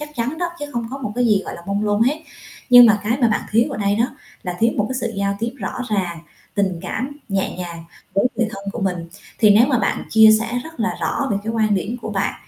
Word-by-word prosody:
chắc 300 - -6
chắn 250 +7 -2
đó 350 -1 -1
chứ 290 - -4
không 235 -1 -2
có 275 - -5
một 215 -6 -4
cái 245 -1 +2
gì, 205 -3 +3
gọi - - -6
là, 170 - -10
mông 200 +2 -1
lung 205 +1 +2
hết. 290 +6 +1 0.5
Nhưng 245 -1 +10
mà 215 -2 +4
cái 230 +5 0
mà 235 - +4
bạn 210 - +1
thiếu 230 +2 +3
ở - - -4
đây 200 0 +1
đó 230 - +3 0.4
là 180 -1 -4
thiếu 230 +3 +3
một 210 - +1
cái 260 - -3
sự 225 - -2
giao 200 0 -1
tiếp 230 +2 -2
rõ 205 +3 -4
ràng, 185 -5 -1 0.4
tình 190 -4 0
cảm 255 +10 -4
nhẹ 195 -1 -1
nhàng 170 -2 -7 0.3
với 195 - +2
người 230 0 +1
thân 195 -2 -8
của - - -5
mình. 180 -3 -2 0.3
Thì 215 - +6
nếu 220 +4 +6
mà 255 -4 +2
bạn 195 - 0
chia 220 0 +7
sẻ 225 - -3 0.2
rất 320 -5 -10
là 225 0 0
rõ 280 -2 -1
về 205 - +1
cái 225 - -2
quan 215 -2 +2
điểm 205 +5 -2
của 220 - -4
bạn, 195 -1 -1
215 Hz, 270 wpm, -20 LUFS, 200-235 Hz, 0.5 s, Nhưng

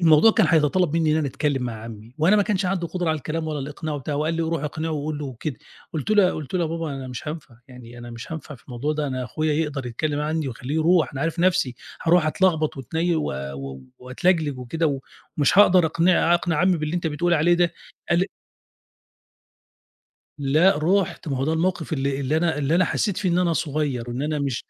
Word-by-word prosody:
الموضوع 165 +5 +6
كان 215 -5 +3
هيتطلّب 160 +1 +2
منّي 160 -2 +2
إن - - +2
أنا 155 -3 0
أتكلّم 140 -1 -1
مع 120 -2 -3
عمّي 115 +1 -10
وأنا 180 +7 +4
ما 205 - +4
كانش 195 -2 0
عندي 180 -2 -1
قُدرة 180 -1 -2
على 155 - +1
الكلام 160 +3 -4
ولا 150 -1 -3
الإقناع 150 +3 -5
وبتاع 145 +1 -4
وقال 155 +3 0
لي: 165 - -1
"روح 160 -2 -2
اقنعه 155 +2 -3
وقُل 150 0 -3
له 150 - -4
وكده." 130 +2 -5 0.4
قُلت 155 +5 -3
له 210 -2 +6
يا 180 - +3
قلُت 155 +3 -7
له: 180 - +2
"يا - - +1
بابا 165 -1 -3
أنا 130 -1 -6
مش 125 +4 -6
هانفع، 150 -5 -7
يعني 120 -1 -12
أنا 120 0 -9
مش 115 +7 -8
هانفع 155 -2 -7
في 125 - -18
الموضوع 130 +5 -3
ده، 150 -1 -2
أنا 130 -1 -3
أخويا 155 +4 -1
يقدَر 145 -4 -2
يتكلّم 145 +5 -2
عنّي 155 -1 -1
وخلّيه 125 +4 -5
يرُوح 160 -2 +3
أنا 135 - -5
عارف 165 +2 -1
نَفْسي 175 -9 +2 0.3
هارُوح 170 -1 +4
أتلخبط 160 -3 +1
وأتني 160 +6 -1
و 155 - -1 0.7
وأتلجلِج 145 +2 0
وكده 140 +2 -1 0.4
ومش 150 +6 +3
هاقدَر 185 -4 +7
أقنع 170 +1 +3
أقنع 170 -2 0
عمّي 180 +2 +3
باللي 155 +1 -3
أنت 170 - -2
بتقول 170 +3 +1
عليه 170 +3 +4
ده." 170 -1 +2 0.4
قال 170 - +4
لي 185 - +2 2.1
لأ 150 +4 +3
رُحت، 180 0 0
ما 135 - -1
هو 135 - -1
ده 155 - 0
الموقِف 175 0 -1
اللي 140 -1 -1
اللي 140 +3 0
أنا 160 -2 +1
اللي 145 +3 +1
أنا 180 +1 +4
حسّيت 205 -5 -1
فيه 195 -3 0
إن 175 - +2
أنا 175 -2 +2
صغيّر، 145 -6 -2
إن 125 +4 -3
أنا 150 0 -1
مش 140 -4 -2
155 Hz, 220 wpm, -23 LUFS, 140-170 Hz, 2.1 s, هاقدَر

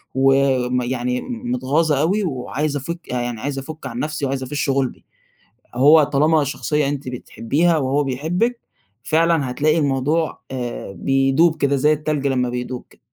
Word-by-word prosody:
وم 135 -2 +3
يعني 125 0 -2
متغاظة 170 - 0
أوي 195 +7 +1
وعايزة 145 -1 -2
أفك 170 +5 -5
يعني 120 -2 -3
عايزة 140 -1 -3
أفُك 155 +2 -9
عن 120 -1 -6
نفسي 150 -1 -2
وعايزة 135 -1 -2
أفش 145 +2 -2
غلبي، 135 -2 -1 0.7
هو 145 +5 +6
طالما 150 +2 +2
شخصية 150 +1 -1
أنتِ 140 -2 -4
بتحبيها 145 +6 0
وهو 140 +1 +1
بيحبِك، 175 - -1 0.4
فعلًا 160 -1 +2
هتلاقي 155 +5 +2
الموضوع 145 +3 0
آآ 120 -6 -5
بيدوب 135 +8 +2
كده، 140 -2 +1
زي 150 +3 +3
التلج 150 -2 -1
لما 125 -2 +1
بيدوب 125 0 -5
كده. - - -22
140 Hz, 145 wpm, -20 LUFS, 130-155 Hz, 0.7 s, هو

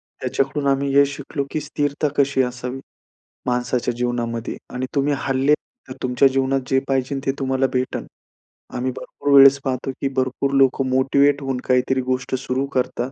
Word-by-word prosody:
त्याच्याकडून 140 +1 -2
आम्ही 140 0 +1
हे 140 0 +7
शिकलो, 140 0 -4
की 155 - -1
स्थिरता 145 0 -1
कशी 140 -1 +3
असावी 125 +1 -4 0.7
माणसाच्या 125 0 0
जीवनामध्ये 120 -1 -2 0.2
आणि 130 +1 -2
तुम्ही 140 +1 +1
हरले, 135 +2 +2 0.3
तर 130 - -6
तुमच्या 130 +2 +4
जीवनात 135 0 +1
जे 135 0 +3
पाहिजे 135 +1 0
ते 135 - +2
तुम्हाला 130 0 +1
भेटेल. 130 0 -2 0.7
आम्ही 130 +1 -1
भरपूर 145 - -4
वेळेस 140 0 +8
पाहतो 130 0 -2
की 140 - +1
भरपूर 130 +1 0
लोकं 135 0 +3
मोटिव्हेट 140 +2 +3
होऊन 135 -2 -2
काहीतरी 130 +1 +2
गोष्ट 130 0 -2
सुरू 130 +1 -2
करतात. 125 0 -1
135 Hz, 155 wpm, -21 LUFS, 125-140 Hz, 0.7 s, वेळेस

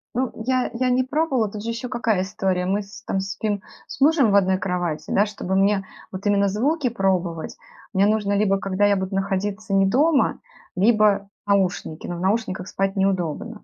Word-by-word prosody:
Ну, 255 0 0
я 255 -1 +1
я 255 +1 0
не 255 +1 +2
пробовала, 265 -5 0
тут 210 -1 -7
же 230 - -4
ещё 230 +2 -4
какая 230 -6 0
история 190 -2 -1
мы 200 +3 0
с 205 +1 -12
там 195 - -1
спим 200 +1 -3 0.3
с 270 - -10
мужем 285 -7 +4
в - - +3
одной 190 -1 +3
кровати, 180 -5 -3
да, 205 - +4
чтоб 210 -3 -8
мне 195 0 +2 0.3
вот 190 +1 -7
именно 200 -1 +3
звуки 260 - 0
пробовать, 185 -7 -1 0.4
мне 195 +1 +3
нужно 210 -1 +1
либо 200 -1 +2
когда 195 +1 0
я 205 0 +4
буду 190 0 -3
находиться 195 +1 -2
не 195 0 +4
дома, 280 +8 +2 0.4
либо 205 -1 +3 0.2
наушники, 185 -5 0
но 175 - -4
в - - -6
наушниках 190 -2 -1
спать 195 +1 -1
неудобно. 185 - -1
200 Hz, 185 wpm, -23 LUFS, 190-225 Hz, 0.4 s, мужем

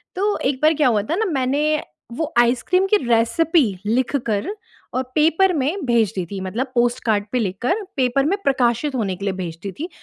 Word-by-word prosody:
तो 410 +2 0
एक 265 -2 -3
बार 310 +1 +5
क्या 300 -3 +2
हुआ 220 -4 +2
था - - +2
ना, 445 +4 0
मैंने 295 -1 0 0.3
वो 320 0 -3
आइसक्रीम 255 +11 +2
की 420 - +4
रेसिपी 265 - +2 0.2
लिखकर 230 -2 0 0.5
और 255 - +1
पेपर 330 +5 +3
में 310 +4 -1
भेज 230 -5 +2
दी 185 -2 -2
थी, 200 - -4
मतलब 235 +8 -3
पोस्टकार्ड 240 -4 +1
पे 250 - +2
लिख 190 -4 -2
कर 370 - 0
पेपर 260 +1 +2
में 380 +7 +1
प्रकाशित 265 0 +1
होने 205 -6 -1
के 200 - -6
लिए 195 - 0
भेज 175 -3 -5
दी 200 - -4
थी, 335 +4 -4
255 Hz, 200 wpm, -21 LUFS, 225-310 Hz, 0.5 s, बार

